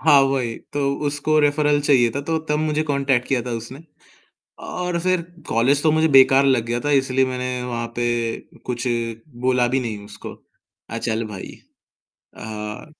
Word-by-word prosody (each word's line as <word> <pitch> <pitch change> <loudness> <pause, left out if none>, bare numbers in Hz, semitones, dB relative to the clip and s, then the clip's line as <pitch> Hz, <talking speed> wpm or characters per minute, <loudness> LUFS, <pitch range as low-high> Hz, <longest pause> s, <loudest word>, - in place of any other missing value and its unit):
हाँ, 140 -1 +6
वही 135 -4 0 0.2
तो 145 - -2 0.3
उसको 145 +2 +1
रेफरल 145 0 +2
चाहिए 130 -5 +4
था 140 +5 -3
तो 160 +3 -1
तब 150 0 +1
मुझे 155 0 0
कॉन्टैक्ट 140 -4 0
किया 130 -2 +1
था 125 - -6
उसने। 125 +6 -8 0.8
और 180 -1 -2
फिर 185 0 +2 0.3
कॉलेज 135 +5 +2
तो 155 - +4
मुझे 160 +1 +3
बेकार 135 -1 +6
लग 130 -4 +2
गया 120 +1 -1
था 145 +3 -1
इसलिए 135 -1 +2
मैंने 125 -1 -3
वहाँ 120 -1 -3
पे 120 - -1 0.6
कुछ 125 0 -3 0.6
बोला 125 -1 +3
भी 130 +2 +1
नहीं 110 -5 -5
उसको 105 0 -9 0.6
अ, 115 - -4
चल 115 0 -1
भाई 100 -3 -8 0.9
अ, 105 -1 -6
135 Hz, 165 wpm, -21 LUFS, 120-145 Hz, 0.9 s, हाँ